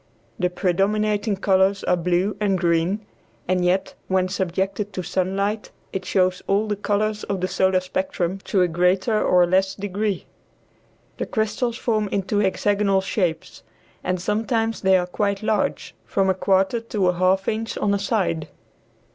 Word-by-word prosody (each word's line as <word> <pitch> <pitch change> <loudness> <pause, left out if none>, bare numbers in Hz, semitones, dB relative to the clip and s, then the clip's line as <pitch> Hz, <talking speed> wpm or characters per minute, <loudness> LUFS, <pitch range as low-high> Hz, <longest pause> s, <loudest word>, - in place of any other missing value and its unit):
The 180 - +2
predominating 205 +3 +1
colors 190 0 +2
are 180 - +2
blue 180 +3 0
and 200 -3 +1
green, 170 +4 +1 0.4
and 180 0 +1
yet 180 +2 +1
when 185 -1 +1
subjected 195 +2 -2
to 185 - -3
sunlight 195 +4 -1 0.2
it 185 -1 -3
shows 185 -1 +1
all 200 +2 +2
the 210 - 0
colors 210 +1 -1
of 195 -2 -2
the 185 - 0
solar 190 0 +2
spectrum 195 -4 -2
to 190 -2 +2
a - - +3
greater 185 +6 +2
or 180 -1 +5
less 190 +2 +1
degree. 200 0 -2 0.9
The - - -2
crystals 230 +2 -1
form 215 -3 0
into 200 +1 -1
hexagonal 200 0 +2
shapes, 180 -4 -2 0.4
and 185 0 -1
sometimes 225 +3 -1
they 190 -1 +5
are 180 - 0
quite 200 +2 -2
large, 215 0 -1
from 195 -1 +1
a - - +1
quarter 190 +4 +2
to 210 -5 0
a - - +2
half 185 +2 +2
inch 225 +1 -2
on 205 -1 +1
a 200 - +1
side. 190 -6 -1
195 Hz, 155 wpm, -23 LUFS, 185-210 Hz, 0.9 s, or